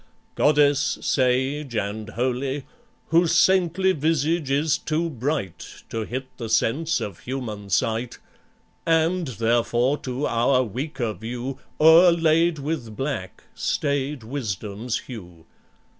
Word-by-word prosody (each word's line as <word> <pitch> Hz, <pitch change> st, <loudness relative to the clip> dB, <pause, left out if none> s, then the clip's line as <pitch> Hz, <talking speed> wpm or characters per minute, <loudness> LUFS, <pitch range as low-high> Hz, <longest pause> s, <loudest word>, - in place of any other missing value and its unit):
goddess, 145 Hz, -1 st, +3 dB
sage 130 Hz, +1 st, 0 dB
and 105 Hz, +1 st, -3 dB
holy, 130 Hz, +4 st, -2 dB, 0.4 s
Whose 165 Hz, 0 st, +3 dB
saintly 190 Hz, +1 st, +3 dB
visage 160 Hz, -1 st, 0 dB
is 145 Hz, +3 st, +1 dB
too 160 Hz, +1 st, -1 dB
bright 130 Hz, -, -4 dB
To 110 Hz, -1 st, -3 dB
hit 130 Hz, +4 st, -4 dB
the 115 Hz, -2 st, -5 dB
sense 135 Hz, +9 st, +1 dB
of 100 Hz, -4 st, -6 dB
human 110 Hz, -6 st, -5 dB
sight, 115 Hz, +6 st, 0 dB, 0.7 s
And, 165 Hz, +1 st, +2 dB
therefore, 120 Hz, +3 st, +1 dB
to 130 Hz, +3 st, -3 dB
our 125 Hz, +3 st, +2 dB
weaker 125 Hz, 0 st, -3 dB
view 120 Hz, +6 st, -6 dB, 0.2 s
O'erlaid 165 Hz, 0 st, +5 dB
with 140 Hz, -7 st, -4 dB
black, 135 Hz, -10 st, -4 dB
staid 140 Hz, -2 st, -1 dB
Wisdom's 110 Hz, -2 st, -3 dB
hue. 90 Hz, -9 st, -11 dB
130 Hz, 110 wpm, -24 LUFS, 115-155 Hz, 0.7 s, O'erlaid